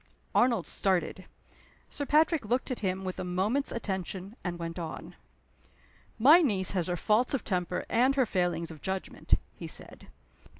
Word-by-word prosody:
Arnold 235 -7 +3
started. 185 -1 -1 0.7
Sir 285 -1 -4
Patrick 315 0 +3
looked 245 +5 -1
at 250 - -3
him 190 -1 -2
with 185 -1 -4
a - - -2
moment's 195 +10 0
attention, 190 -1 -4
and 180 -2 -3
went 165 +1 -5
on: 165 -2 -7 1.0
"My 295 +10 +8
niece 200 - +1
has 180 -4 0
her 180 -1 -1
faults 230 - +2
of 270 - -3
temper 180 -2 -2
and 255 +4 +3
her 265 -2 +3
failings 175 -5 -1
of 155 -2 -11
judgment," 190 0 -1 0.2
he - - -8
said. - - -5
190 Hz, 160 wpm, -29 LUFS, 180-245 Hz, 1.0 s, My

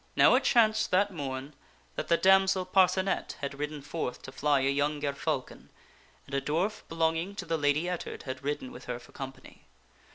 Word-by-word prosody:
" - - -35
Now - - +6
it - - +3
chanced 220 -3 +4
that 200 +2 +2
morn 135 -2 -5 0.4
that - - -3
the 170 - +4
damsel 190 0 +4
Parcenet 190 +1 +2
had 140 -1 -5
ridden 150 -1 -4
forth 145 -4 -4
to 130 - -8
fly 145 0 +2
a 135 - +2
young 145 +1 0
gerfalcon, 140 -1 -3 0.6
and 135 - -14
a 140 - +1
dwarf 180 +10 -1
belonging 165 +3 0
to - - -5
the 165 - 0
Lady 150 +2 +1
Ettard 180 -1 -4
had 130 0 -6
ridden 150 - -3
with 245 - -11
her 125 -1 -3
for 120 - -16
company. 135 -1 -10
155 Hz, 190 wpm, -29 LUFS, 140-185 Hz, 0.6 s, Now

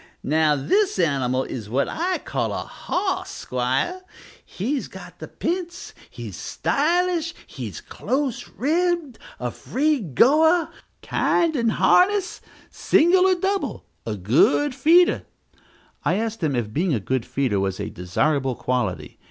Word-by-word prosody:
Now, 155 +1 +2
this 370 - +1
animal 135 -7 +1
is 110 -6 -7
what 135 +5 +1
I 360 +3 -1
call - - -3
a - - -3
hos, 375 0 -3
'squire; 130 - -2 0.4
he's 260 +8 -3
got - - -12
the - - -7
p'ints, 345 0 -4 0.2
he's - - -8
stylish, 340 +2 0
he's - - -7
close 265 -2 -3
ribbed, 330 -1 -1 0.2
a 125 -1 -3
free 295 - 0
goer, 305 - +3 0.3
kind 330 -2 +1
in 235 -4 +1
harness 375 - +3 0.3
single 365 +4 +4
or 375 - +4
double 385 +2 -2 0.2
a 110 - -3
good 145 - +3
feeder." 330 +7 +4 0.8
I 175 - +1
asked 225 +1 -3
him 150 -5 0
if 110 -3 -2
being 165 -1 +1
a - - -1
good 130 +5 -1
feeder 125 -8 -1
was 95 -1 -2
a - - -4
desirable 130 - 0
quality. 125 0 -3
250 Hz, 135 wpm, -23 LUFS, -, 0.8 s, single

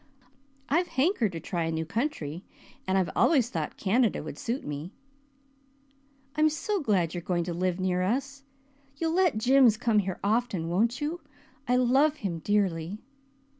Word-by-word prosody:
I 310 - +3
hankered 285 - +1
to 165 - -4
try 170 +1 -2
a 165 - -1
new 160 0 -2
country 180 - -3 0.4
and 190 0 +2
I've 185 -2 +1
always 260 -7 +3
thought - - -4
Canada 220 0 +1
would 150 -1 -8
suit 240 +4 -3
me." 150 +6 -6 1.4
"I'm 310 0 +4
so 400 +7 -2
glad 190 - +1
you 175 - -3
are - - -9
going 175 0 -1
to 175 0 -4
live 180 +1 -1
near 185 -1 0
us. 275 +8 -2 0.5
You'll 325 +1 -1
let 360 -8 +3
Jims 250 -1 +5
come 230 -2 +2
here 190 -2 -3
often, 205 -6 0
won't 230 - +1
you? 320 +4 -3 0.5
I 250 - +3
love 265 +5 +3
him 185 - -4
dearly." 190 -2 0
215 Hz, 165 wpm, -28 LUFS, 175-270 Hz, 1.4 s, Jims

